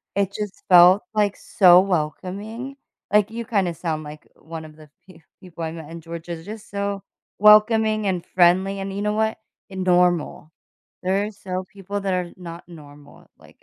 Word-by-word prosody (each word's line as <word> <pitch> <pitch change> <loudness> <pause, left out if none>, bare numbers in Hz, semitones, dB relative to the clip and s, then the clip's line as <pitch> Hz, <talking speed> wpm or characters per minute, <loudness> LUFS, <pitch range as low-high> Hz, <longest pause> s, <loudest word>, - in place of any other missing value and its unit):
it 200 -1 0
just 210 -2 -6
felt, 180 +2 +7
like, 205 -2 +1
so 180 -3 +5
welcoming, 195 - -4 0.4
like, 210 -1 +4
you 230 0 -5
kinda 195 -6 0
sound 155 -1 -3
like 150 0 -11
one 160 0 -9
of 155 -1 -14
the 155 -1 -16 0.2
pe 175 -3 -17 0.2
people 170 -2 -9
I 160 - -3
met 165 -1 -10
in 170 - -8
Georgia, 170 +1 -7
they're 160 - -12
just 215 +3 -10
so 200 -1 -3 0.3
welcoming 215 0 +5
and 180 -2 -2
friendly, 185 +3 +2
and 195 0 -5
you 200 - -4
know 210 0 0
what? 220 +1 0 0.3
And 190 -1 -5
normal. 175 -3 +1 0.5
There 190 +2 +1
are 215 - -6
so 185 -2 -5
people 200 +1 -5
that 195 -1 -1
are 180 -1 -2
not 175 -1 -10
normal, 145 -3 -15
like, - - -20
185 Hz, 180 wpm, -22 LUFS, 170-205 Hz, 0.5 s, felt